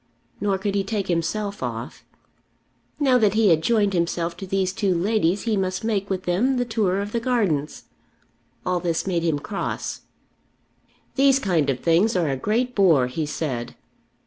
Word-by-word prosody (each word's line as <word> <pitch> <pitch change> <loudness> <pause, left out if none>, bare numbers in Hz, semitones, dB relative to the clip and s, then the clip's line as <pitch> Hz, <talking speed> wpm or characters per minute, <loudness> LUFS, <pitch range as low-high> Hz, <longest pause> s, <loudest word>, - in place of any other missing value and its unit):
Nor 200 -2 0
could 200 +1 -2
he 200 -1 +1
take 195 -1 -3
himself 200 +5 -1
off. - - -5 1.0
Now 260 -4 +4
that 210 -2 +3
he 220 -2 +4
had 160 -2 +4
joined 205 +1 +2
himself 170 -1 -1
to 195 - -7
these 190 -1 0
two 195 -2 0
ladies 195 0 +1
he 225 -2 0
must 185 -1 -2
make 205 -3 -1
with 185 -1 -2
them 235 +10 +1
the 245 - 0
tour 210 -5 0
of 205 +1 -5
the 235 - 0
gardens. 200 - -1 0.8
All 180 -1 +1
this 170 -2 -1
made 180 -3 0
him 165 -3 +1
cross. 195 +7 -4 1.2
"These 275 0 +5
kind 175 - +1
of 130 -2 -1
things 175 +7 +3
are 170 -4 +1
a 135 - 0
great 230 - -1
bore," 170 - +4
he 150 +5 -3
said. 130 -6 -4
195 Hz, 170 wpm, -23 LUFS, 170-215 Hz, 1.2 s, These